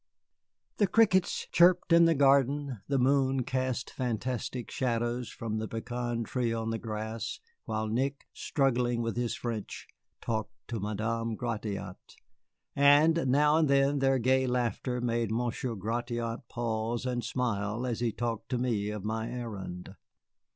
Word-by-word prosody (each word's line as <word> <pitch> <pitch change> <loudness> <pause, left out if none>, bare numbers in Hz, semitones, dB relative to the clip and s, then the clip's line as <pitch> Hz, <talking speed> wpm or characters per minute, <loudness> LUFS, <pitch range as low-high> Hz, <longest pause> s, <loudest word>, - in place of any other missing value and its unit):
The 205 - +3
crickets 190 -2 +3
chirped 175 0 +5
in 170 0 +7
the 165 -1 +4
garden, 140 -3 +3
the 140 - +1
moon 135 0 +2
cast 130 0 -2
fantastic 125 0 -3
shadows 120 -1 -1
from 110 -1 -4
the 110 - -3
pecan 120 +1 -3
tree 120 0 -1
on 115 0 -2
the 115 - -2
grass, 110 +1 -4 0.3
while 110 0 -2
Nick, 135 +5 -1
struggling 125 -4 0
with 115 - -2
his 120 -1 -1
French, 115 -4 -5 0.3
talked 110 -2 -3 0.2
to 115 - -3
Madame 110 +3 -2
Gratiot; 105 -5 -5 0.6
and 145 +2 +5
now 150 +4 +4
and 160 -1 +3
then 140 +1 +3
their 135 0 +3
gay 130 +2 +2
laughter 125 0 -1
made 120 -2 0
Monsieur 120 +1 -2
Gratiot 115 +3 -3
pause 115 0 -2
and 125 -1 -1
smile 115 -2 -1
as 120 -3 -2
he 120 -1 0
talked 115 -1 -3
to 125 - 0
me 115 -5 0
of 105 -2 -5
my 110 +1 -2
errand. 100 -6 -6
120 Hz, 145 wpm, -30 LUFS, 115-130 Hz, 0.6 s, in